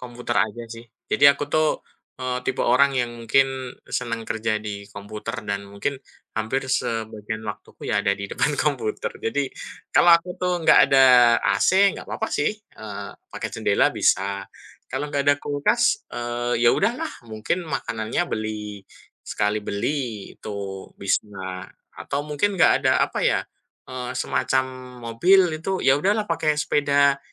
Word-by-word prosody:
Komputer 120 Hz, -1 st, -4 dB
aja, 120 Hz, +3 st, -9 dB
sih. 115 Hz, 0 st, -9 dB, 0.2 s
Jadi 145 Hz, -, +2 dB
aku 140 Hz, +1 st, -2 dB
tuh, 155 Hz, +1 st, +2 dB, 0.5 s
eee, 125 Hz, 0 st, -3 dB
tipe -, -, -2 dB
orang 125 Hz, +4 st, +4 dB
yang 120 Hz, -1 st, 0 dB
mungkin 130 Hz, +2 st, +1 dB, 0.2 s
senang 115 Hz, -2 st, -3 dB
kerja 110 Hz, -1 st, -1 dB
di 105 Hz, -1 st, -6 dB
komputer 105 Hz, +3 st, -7 dB
dan 100 Hz, 0 st, -2 dB
mungkin, 100 Hz, +8 st, -2 dB, 0.4 s
hampir 110 Hz, +5 st, -1 dB
sebagian 110 Hz, -3 st, -2 dB
waktuku 105 Hz, -2 st, -7 dB
ya -, -, +2 dB
ada 100 Hz, -, +2 dB
di 100 Hz, -1 st, -7 dB
depan 150 Hz, -, 0 dB
komputer. 135 Hz, -7 st, -1 dB
Jadi, 135 Hz, +4 st, -1 dB, 0.4 s
kalau 175 Hz, -1 st, +8 dB
aku 180 Hz, +2 st, -1 dB
tuh 180 Hz, -1 st, -1 dB
nggak -, -, +6 dB
ada 135 Hz, -1 st, +6 dB, 0.4 s
AC, 195 Hz, +1 st, +4 dB
nggak -, -, -10 dB
papa 220 Hz, -, -3 dB
sih, 145 Hz, -, +1 dB
eee, 105 Hz, -, -9 dB, 0.2 s
pakai -, -, -4 dB
jendela -, -, +2 dB
bisa. 100 Hz, +1 st, +1 dB, 0.5 s
Kalau 145 Hz, 0 st, -4 dB
nggak 140 Hz, -, +1 dB
ada 145 Hz, -, +6 dB
kulkas, 235 Hz, -, +1 dB
eee, 120 Hz, 0 st, -2 dB
ya 120 Hz, -, +7 dB
udahlah. 300 Hz, +8 st, 0 dB, 0.2 s
Mungkin 110 Hz, +11 st, -3 dB
makanannya 115 Hz, -1 st, -2 dB
beli 105 Hz, -1 st, -4 dB, 0.5 s
sekali 105 Hz, +1 st, 0 dB
beli 110 Hz, +1 st, -3 dB
itu, 100 Hz, -2 st, -6 dB
bisa. 95 Hz, -2 st, -3 dB, 0.3 s
Atau 140 Hz, -, -3 dB
mungkin 150 Hz, +7 st, 0 dB
nggak 180 Hz, -, +4 dB
ada -, -, +5 dB
apa -, -, -1 dB
ya, -, -, +2 dB, 0.5 s
eee, 125 Hz, 0 st, -5 dB
semacam 130 Hz, 0 st, 0 dB, 0.5 s
mobil 175 Hz, +6 st, +4 dB
itu, 190 Hz, +4 st, -2 dB
ya 135 Hz, +1 st, +4 dB
udahlah 205 Hz, +7 st, +1 dB
pakai 155 Hz, -2 st, +1 dB
sepeda 140 Hz, -1 st, +2 dB
125 Hz, 145 wpm, -23 LUFS, 110-145 Hz, 0.5 s, kalau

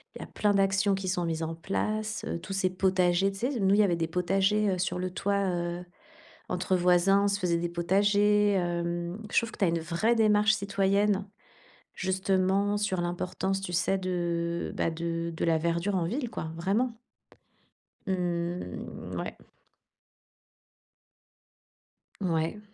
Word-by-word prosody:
Il -, -, -8 dB
y -, -, -4 dB
a -, -, -9 dB
plein 205 Hz, -1 st, +1 dB
d'actions 195 Hz, 0 st, +2 dB
qui 190 Hz, -1 st, -3 dB
sont 180 Hz, -2 st, 0 dB
mises 165 Hz, -1 st, -2 dB
en 160 Hz, +1 st, -3 dB
place, 215 Hz, +5 st, -2 dB
heu. 170 Hz, -, -3 dB
Tous 195 Hz, -, -7 dB
ces 190 Hz, -1 st, +1 dB
potagers, 185 Hz, 0 st, +2 dB
tu 195 Hz, -, -9 dB
sais, 250 Hz, 0 st, -1 dB
nous, 195 Hz, 0 st, +4 dB
il -, -, +3 dB
y -, -, +6 dB
avait 175 Hz, -4 st, +2 dB
des 165 Hz, -1 st, -1 dB
potagers, 195 Hz, +5 st, +1 dB
heu, -, -, -5 dB
sur 180 Hz, 0 st, -1 dB
le 185 Hz, 0 st, -2 dB
toit, 200 Hz, +1 st, 0 dB
heu, 175 Hz, 0 st, -3 dB, 0.7 s
entre 185 Hz, +1 st, 0 dB
voisins, 180 Hz, +3 st, +4 dB
on -, -, +3 dB
se 200 Hz, 0 st, 0 dB
faisait 175 Hz, -3 st, +1 dB
des 170 Hz, +1 st, -1 dB
potagers, 205 Hz, +4 st, +3 dB
hem. 175 Hz, 0 st, -2 dB
Je -, -, 0 dB
trouve 230 Hz, -1 st, +2 dB
que -, -, -12 dB
tu -, -, +1 dB
as -, -, +3 dB
une 165 Hz, 0 st, 0 dB
vraie 170 Hz, +8 st, +1 dB
démarche 215 Hz, -1 st, +4 dB
citoyenne, 200 Hz, 0 st, +1 dB, 0.7 s
justement, 190 Hz, +2 st, +1 dB
sur 190 Hz, -4 st, -1 dB
l'importance, 180 Hz, +2 st, -2 dB
tu 180 Hz, -2 st, -5 dB
sais, 180 Hz, +3 st, +1 dB
de, 170 Hz, -2 st, -2 dB
bah, -, -, +1 dB
de 170 Hz, 0 st, -3 dB
de -, -, -1 dB
la 165 Hz, -1 st, +3 dB
verdure 170 Hz, +4 st, 0 dB
en 170 Hz, -2 st, +1 dB
ville 245 Hz, -, -2 dB
quoi, 160 Hz, -7 st, -4 dB
vraiment. 215 Hz, +8 st, 0 dB, 1.1 s
Mmh, 175 Hz, -2 st, -3 dB
ouais. -, -, -5 dB, 2.9 s
Mouais. 165 Hz, +1 st, 0 dB
185 Hz, 165 wpm, -28 LUFS, 175-200 Hz, 2.9 s, y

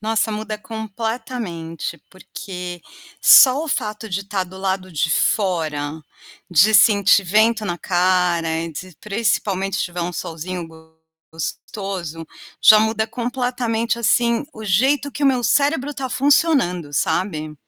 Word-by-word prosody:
Nossa, 220 Hz, 0 st, 0 dB
muda 215 Hz, 0 st, -4 dB
completamente, 220 Hz, -6 st, -5 dB
porque 180 Hz, -2 st, -8 dB, 0.4 s
só 265 Hz, +3 st, +7 dB
o 320 Hz, -, -7 dB
fato 220 Hz, -4 st, -3 dB
de 195 Hz, 0 st, -2 dB
estar 200 Hz, -1 st, -3 dB
do 185 Hz, +1 st, -13 dB
lado 190 Hz, -1 st, -2 dB
de 160 Hz, 0 st, -1 dB
fora, 160 Hz, -7 st, -1 dB, 0.5 s
de 175 Hz, +6 st, +5 dB
sentir 200 Hz, -1 st, +5 dB
vento 215 Hz, +4 st, +2 dB
na 175 Hz, -3 st, -2 dB
cara, 180 Hz, -2 st, +1 dB, 0.2 s
de 180 Hz, +3 st, -9 dB
principalmente 200 Hz, -2 st, -1 dB
se -, -, 0 dB
tiver 175 Hz, 0 st, -6 dB
um 175 Hz, +1 st, -3 dB
solzinho 170 Hz, +2 st, -5 dB, 0.7 s
gostoso, 165 Hz, 0 st, -6 dB, 0.4 s
já 215 Hz, -2 st, +8 dB
muda 220 Hz, 0 st, 0 dB
completamente 240 Hz, -1 st, -2 dB
assim 235 Hz, +1 st, +2 dB
o 220 Hz, -, -9 dB
jeito 265 Hz, +9 st, +1 dB
que 295 Hz, -, -6 dB
o -, -, +4 dB
meu 255 Hz, -2 st, +2 dB
cérebro 285 Hz, +3 st, +1 dB
está 270 Hz, -2 st, -5 dB
funcionando, 255 Hz, -, +1 dB
sabe. 155 Hz, 0 st, -1 dB
205 Hz, 130 wpm, -20 LUFS, 175-230 Hz, 0.7 s, já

